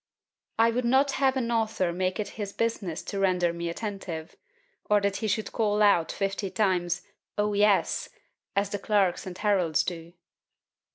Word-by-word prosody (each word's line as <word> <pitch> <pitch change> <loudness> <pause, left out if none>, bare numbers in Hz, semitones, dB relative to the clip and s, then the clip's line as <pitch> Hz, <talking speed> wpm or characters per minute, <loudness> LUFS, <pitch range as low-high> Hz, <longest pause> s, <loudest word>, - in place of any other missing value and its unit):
I 230 +1 +5
would 250 +2 -1
not 265 +4 +3
have 270 -1 +2
an 240 -2 -1
author 220 -6 0
make 185 +3 -1
it 210 - -2
his 205 -2 -6
business 200 -7 -2
to 200 - -4
render 180 -3 +2
me 170 0 -3
attentive; 175 -4 -5 0.5
or 210 0 +5
that 200 0 0
he 220 - -2
should 215 +1 -1
cry 210 -2 +1
out 170 -4 0
fifty 195 0 -2
times 180 -4 0 0.3
O 210 0 +1
yes! 205 -1 +2 0.5
as 200 0 +1
the 205 - -2
clerks 195 -3 +1
and 180 -1 -7
heralds 185 -7 +2
do. 170 -1 -6
200 Hz, 165 wpm, -27 LUFS, 180-220 Hz, 0.5 s, I